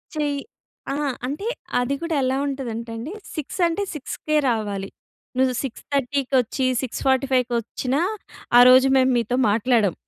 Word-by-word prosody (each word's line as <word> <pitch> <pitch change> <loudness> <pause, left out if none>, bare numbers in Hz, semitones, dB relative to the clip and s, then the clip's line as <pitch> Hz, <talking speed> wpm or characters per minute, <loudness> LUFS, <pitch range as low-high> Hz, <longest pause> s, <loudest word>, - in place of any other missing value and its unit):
చెయ్ 290 -2 0 0.5
అహా! 290 0 -1 0.2
అంటే 295 - -4 0.3
అది 245 +3 0
కూడా 335 -2 -1
ఎలా 260 +1 +1
ఉంటదంటండి, 235 0 -5 0.2
6 310 +3 -5
అంటే 335 +4 -1
6కే 305 +2 -2
రావాలి. 205 -4 -2 0.5
నువ్వు 260 -1 +3
సిక్స్ 260 - -6
థర్టీకొచ్చి, 265 -1 0 0.2
6:45కి 260 -1 +1
వచ్చినా 255 +5 -2 0.6
ఆ - - +10
రోజు 255 +1 +7
మేము 260 0 +4
మీతో 235 +1 0 0.2
మాట్లాడం. 220 -3 +2
260 Hz, 125 wpm, -23 LUFS, 240-280 Hz, 0.6 s, ఆ